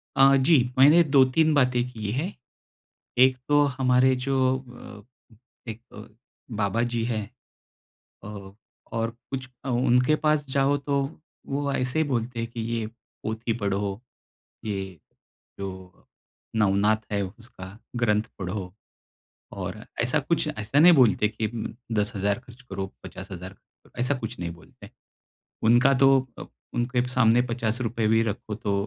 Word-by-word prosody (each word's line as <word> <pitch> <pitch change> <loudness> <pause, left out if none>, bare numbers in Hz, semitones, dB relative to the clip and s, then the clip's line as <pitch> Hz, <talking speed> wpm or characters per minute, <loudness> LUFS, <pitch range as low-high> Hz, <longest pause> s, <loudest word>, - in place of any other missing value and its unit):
अ, 135 0 +6
जी। 145 +4 +5 0.2
मैंने 150 +6 +7
2-3 145 +2 +4
बातें 125 -4 +3
की 110 -4 -4
हैं। 150 - -2 0.9
एक 130 0 +6
तो 145 0 +5
हमारे 130 0 +4
जो 130 0 +1
अ, 125 -2 -14 0.4
एक 110 +1 -8 0.8
बाबाजी 115 +3 0
हैं। 110 -3 -2 1.0
अ, 100 -2 -9 0.4
और 115 0 -1 0.2
कुछ 130 -1 -4 0.2
अ, 135 - -5
उनके 125 +3 +3
पास 150 -1 +2
जाओ 140 +1 +2
तो 140 0 0 0.4
वो 140 0 -2
ऐसे 125 +2 -1
ही 160 - +3
बोलते 120 -2 -2
हैं 115 - -3
कि 115 - -6
ये 115 0 -2 0.4
पोथी 110 +2 -2
पढ़ो, 100 -1 -2 0.6
ये 100 -3 -2 0.8
जो 95 -2 -8 0.5
नवनाथ 105 +1 +3 0.2
है 100 - +1
उसका 105 -1 -10 0.2
ग्रंथ 105 -3 +2 0.2
पढ़ो। 90 0 -4 0.8
और - - -6 0.2
ऐसा - - +2
कुछ - - 0
ऐसा 110 +6 -1
नहीं 175 +3 +8
बोलते 115 -6 +4
कि 110 0 -3
म 115 -2 -4 0.2
10,000 105 0 0
ख़र्च 125 0 -16
करो, 95 0 -3 0.2
50,000 95 -1 -8 0.4
ऐसा 125 +4 +2
कुछ 120 0 -6
नहीं 85 -1 -3
बोलते। 85 -2 -15 0.7
उनका 120 +5 +5
तो 135 0 +6 0.2
अ, - - -7 0.3
उनके 120 +1 0
सामने 120 -1 +4
₹50 115 -1 -1
भी 115 +1 +4
रखो 105 0 -4
तो 105 -1 -2
120 Hz, 135 wpm, -25 LUFS, 105-130 Hz, 1.0 s, नहीं